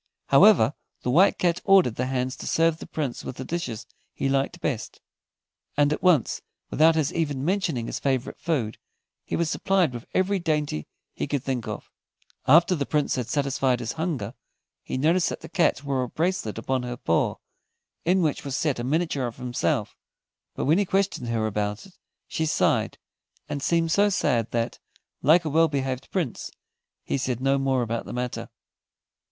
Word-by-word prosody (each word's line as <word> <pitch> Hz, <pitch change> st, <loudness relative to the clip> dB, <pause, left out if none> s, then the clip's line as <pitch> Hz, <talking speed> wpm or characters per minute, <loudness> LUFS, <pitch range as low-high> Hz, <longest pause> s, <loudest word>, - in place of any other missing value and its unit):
However, -, -, +6 dB, 0.3 s
the 125 Hz, -, 0 dB
White 180 Hz, +9 st, +5 dB
Cat 175 Hz, -1 st, +1 dB
ordered 195 Hz, -, +5 dB
the 125 Hz, +3 st, -2 dB
hands 130 Hz, 0 st, -1 dB
to -, -, -7 dB
serve 165 Hz, 0 st, +2 dB
the -, -, -9 dB
Prince 140 Hz, -6 st, -3 dB
with -, -, -6 dB
the 130 Hz, -, -6 dB
dishes 120 Hz, -10 st, -4 dB, 0.3 s
he 135 Hz, -, -1 dB
liked 135 Hz, +5 st, 0 dB
best, 130 Hz, -9 st, -3 dB, 0.8 s
and 145 Hz, 0 st, +4 dB
at -, -, -4 dB
once, 175 Hz, -, +3 dB, 0.3 s
without 160 Hz, +2 st, +5 dB
his 155 Hz, -3 st, 0 dB
even 145 Hz, -5 st, -1 dB
mentioning 170 Hz, -, 0 dB
his -, -, -4 dB
favorite 130 Hz, -2 st, -1 dB
food, 130 Hz, -10 st, -1 dB, 0.4 s
he -, -, -3 dB
was 170 Hz, -1 st, 0 dB
supplied 185 Hz, -9 st, +1 dB
with 120 Hz, -1 st, -8 dB
every 190 Hz, +1 st, +2 dB
dainty 150 Hz, -, -1 dB, 0.3 s
he -, -, -3 dB
could 140 Hz, -3 st, -2 dB
think 130 Hz, -4 st, -2 dB
of. -, -, -6 dB, 0.6 s
After 170 Hz, +6 st, +6 dB
the 145 Hz, -6 st, -1 dB
Prince 150 Hz, -1 st, +1 dB
had 125 Hz, -4 st, -2 dB
satisfied 135 Hz, -3 st, +1 dB
his 120 Hz, -2 st, -3 dB
hunger, 155 Hz, -, -3 dB, 0.5 s
he -, -, -4 dB
noticed 165 Hz, +6 st, +3 dB
that -, -, -6 dB
the -, -, -8 dB
Cat 165 Hz, -6 st, +1 dB
wore 135 Hz, -2 st, 0 dB
a 125 Hz, -, -3 dB
bracelet 165 Hz, -, -1 dB
upon 130 Hz, +3 st, -1 dB
her 125 Hz, 0 st, -5 dB
paw, 85 Hz, -, +1 dB, 0.7 s
in 180 Hz, +1 st, +3 dB
which 155 Hz, -3 st, 0 dB
was 140 Hz, -1 st, -3 dB
set 145 Hz, -5 st, 0 dB
a -, -, -2 dB
miniature 145 Hz, -1 st, 0 dB
of 115 Hz, -, -8 dB
himself; 125 Hz, -2 st, -1 dB, 0.6 s
but -, -, -2 dB
when 155 Hz, +7 st, +4 dB
he -, -, +3 dB
questioned 190 Hz, -9 st, 0 dB
her 115 Hz, -2 st, 0 dB
about 105 Hz, -, -2 dB
it, 195 Hz, -, -17 dB, 0.3 s
she 160 Hz, -, -1 dB
sighed, 155 Hz, -, +1 dB, 0.5 s
and 145 Hz, -2 st, -4 dB
seemed 165 Hz, +2 st, +1 dB
so 205 Hz, +4 st, +4 dB
sad 120 Hz, -, +1 dB
that, 115 Hz, 0 st, -2 dB, 0.4 s
like 165 Hz, +3 st, +5 dB
a -, -, 0 dB
well 165 Hz, +2 st, +4 dB
behaved 135 Hz, -2 st, -3 dB
Prince, 170 Hz, -, -2 dB, 0.5 s
he 140 Hz, -, -1 dB
said 125 Hz, -3 st, -1 dB
no 135 Hz, +1 st, +2 dB
more 135 Hz, -2 st, +1 dB
about 115 Hz, 0 st, -3 dB
the -, -, -6 dB
matter. 125 Hz, 0 st, -4 dB
140 Hz, 180 wpm, -25 LUFS, 125-165 Hz, 0.8 s, However